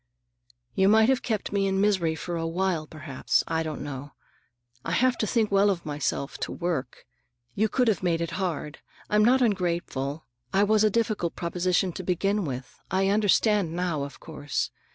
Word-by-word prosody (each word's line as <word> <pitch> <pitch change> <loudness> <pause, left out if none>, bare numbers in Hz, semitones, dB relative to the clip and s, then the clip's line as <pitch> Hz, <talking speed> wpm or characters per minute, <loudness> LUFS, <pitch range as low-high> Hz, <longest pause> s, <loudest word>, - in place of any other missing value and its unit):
"You 190 0 +3
might 220 +2 +5
have 265 -1 +2
kept 215 -4 -2
me 195 -1 +1
in 190 0 0
misery 190 -6 +2
for 175 +2 -5
a 165 0 -2
while, 170 -2 -1
perhaps. 155 -4 -1
I 160 0 0
don't 155 -2 -4
know. 145 0 -7 0.7
I 165 - -3
have 255 +6 +3
to 215 - 0
think 220 -2 +1
well 200 +1 +4
of 180 -4 -2
myself, 145 -1 -3
to - - -3
work. 165 -8 -3 0.5
You 215 +2 +1
could 250 +3 +1
have 220 - +2
made 170 -3 +1
it 170 0 -3
hard. 160 -4 -3 0.3
I'm 210 0 +4
not 255 +3 +5
ungrateful. 170 - -1 0.3
I 195 - +5
was 215 +1 +3
a 215 - +5
difficult 215 -6 -1
proposition 180 +1 0
to 180 - -6
deal 195 +4 0
with. 135 -6 -6
I 190 +1 +1
understand 205 -3 +3
now, 175 -4 -1
of 140 0 -6
course. 145 -4 -3
180 Hz, 180 wpm, -26 LUFS, 160-205 Hz, 0.7 s, might